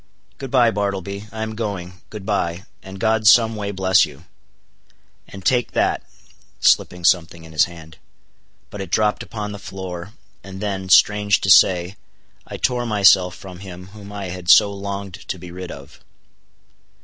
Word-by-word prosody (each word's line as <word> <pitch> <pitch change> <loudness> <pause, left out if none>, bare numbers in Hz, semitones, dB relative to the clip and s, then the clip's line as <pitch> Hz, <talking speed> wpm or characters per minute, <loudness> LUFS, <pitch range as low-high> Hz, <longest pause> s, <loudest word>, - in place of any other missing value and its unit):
"Good 135 - -6
bye, 120 -3 +4
Bartleby; 100 0 -3
I 110 0 -5
am 110 0 -5
going—good 100 -2 -7
bye, 95 -4 -2 0.2
and 95 0 -10
God 110 0 +1
some 115 0 +6
way 100 -1 -4
bless 95 -2 +3
you; - - -7 1.0
and 95 -2 -12
take 125 +1 +1
that," - - +1 0.6
slipping 90 -1 +2
something 85 -2 +1
in 80 - -13
his 80 - +3
hand. 80 -2 -13 0.7
But 105 - -7
it 95 - -6
dropped 105 +3 +1
upon 105 -2 -6
the 100 - -8
floor, 95 0 -8 0.3
and 95 -1 -9
then,—strange 105 +1 +3
to 95 - +2
say—I 90 +1 +1
tore 125 -1 -1
myself 95 -4 +4
from 90 -2 -11
him 90 -1 -10
whom 100 0 -12
I 100 -2 -6
had 90 -1 -7
so 100 0 +7
longed 100 -1 -6
to - - -4
be 90 0 -10
rid 90 0 -8
of. 70 0 -11
100 Hz, 155 wpm, -21 LUFS, 90-105 Hz, 1.0 s, so